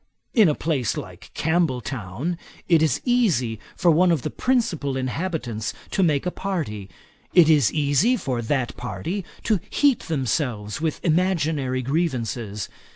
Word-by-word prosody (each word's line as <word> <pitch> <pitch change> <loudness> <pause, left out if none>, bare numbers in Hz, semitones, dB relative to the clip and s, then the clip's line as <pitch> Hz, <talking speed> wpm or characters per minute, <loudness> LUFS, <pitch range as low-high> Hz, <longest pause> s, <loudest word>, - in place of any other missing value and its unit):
In 215 -8 +6
a 150 - +1
place 140 -8 -1
like - - -8
Campbelltown, 140 - -1 0.3
it 165 -3 +5
is 155 -6 +2
easy 170 - +2 0.2
for 175 -3 +4
one 175 +3 +4
of 160 -7 +1
the 155 - -3
principal 165 - 0
inhabitants 130 -5 -3 0.2
to - - +1
make 155 -5 +2
a 180 - 0
party. 145 - -4 0.5
It 165 -3 +7
is 145 -7 +4
easy 150 - +2
for 130 - -2
that 120 +1 -1
party 170 +10 -4 0.2
to 215 -4 +2
heat 285 -5 +3
themselves 125 -6 -1
with 160 -2 -2
imaginary 155 -7 +1
grievances. 120 - -2
150 Hz, 140 wpm, -23 LUFS, 125-175 Hz, 0.5 s, It